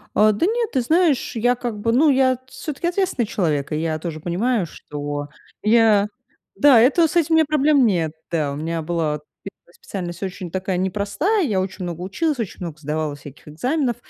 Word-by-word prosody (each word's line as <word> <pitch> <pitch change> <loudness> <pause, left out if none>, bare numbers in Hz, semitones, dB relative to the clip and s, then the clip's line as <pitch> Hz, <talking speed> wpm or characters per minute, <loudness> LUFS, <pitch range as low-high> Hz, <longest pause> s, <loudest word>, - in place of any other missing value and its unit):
А, 215 0 +5
да 210 +12 +1
нет, 460 +1 0
ты 265 - +2
знаешь, 320 0 +2
я 245 +2 +3
как 240 -3 -4
бы, 230 +2 +1
ну, 295 +6 +5
я 260 -2 +3
всё-таки 305 +1 -5
ответственный 355 - 0
человек. 155 -8 -1
И - - 0
я 160 -1 -1
тоже 160 -1 -6
понимаю, 195 +5 0
что 145 -1 -6 0.3
я 215 -2 +4 0.5
Да, 280 -5 +6
это, 310 +7 +4
с - - -7
этим 330 -1 +3
у - - +6
меня 320 -1 +4
проблем 295 -2 +3
нет, 170 -7 0 0.2
да. 155 -4 0
У - - -6
меня 165 +2 -3
была 155 -2 -1 0.2
1 195 -3 -13
специальность 175 -2 -7
очень 185 -2 -5
такая, 190 +1 -2
непростая. 205 - 0
Я 200 -7 0
очень 185 -1 -5
много 175 -1 -5
училась, 280 - -1
очень 225 -6 -5
много 170 -4 -6
сдавала 150 0 -3
всяких 145 +1 -13
экзаменов. 250 - -1
200 Hz, 190 wpm, -21 LUFS, 165-270 Hz, 0.5 s, Да